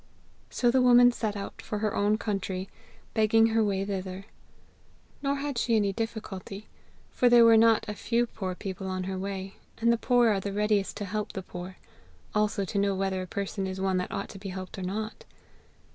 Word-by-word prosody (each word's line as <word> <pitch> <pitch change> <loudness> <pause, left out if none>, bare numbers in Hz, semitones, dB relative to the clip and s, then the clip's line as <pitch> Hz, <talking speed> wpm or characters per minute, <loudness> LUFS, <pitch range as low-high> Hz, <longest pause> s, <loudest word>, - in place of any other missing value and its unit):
So 240 -1 +2
the 260 +1 +3
woman 245 0 +7
set 215 -3 -3
out 200 - -7
for 210 - -4
her 210 0 -1
own 205 +1 +2
country, 195 -3 -3 0.5
begging 220 +1 +4
her 225 0 +2
way 195 -2 0
thither. 190 -1 -5 1.0
Nor 280 0 0
had 280 -3 -3
she 235 -1 +2
any 205 -2 +2
difficulty, 215 -2 -5 0.5
for 250 - +3
there 240 -1 +7
were 230 0 +7
not 225 0 +4
a 210 - -3
few 235 +3 0
poor 190 -5 -5
people 190 0 -6
on 185 0 -2
her 190 0 -4
way, 195 0 -5 0.2
and 235 +1 +3
the 235 - -1
poor 245 -2 +4
are 205 -2 +2
the 200 +1 -4
readiest 210 -1 0
to 205 - -4
help 210 +1 -3
the 190 - -5
poor, 180 +1 -8 0.6
also 210 -2 +1
to 200 - -2
know 200 -1 +1
whether 190 -1 -1
a 185 - -6
person 195 0 -3
is 190 0 -5
one 190 -1 +1
that 180 - -3
ought 200 -1 -4
to 195 - -10
be 195 0 -6
helped 185 +1 -7
or - - -5
not. 215 +4 -4
205 Hz, 205 wpm, -28 LUFS, 190-225 Hz, 1.0 s, woman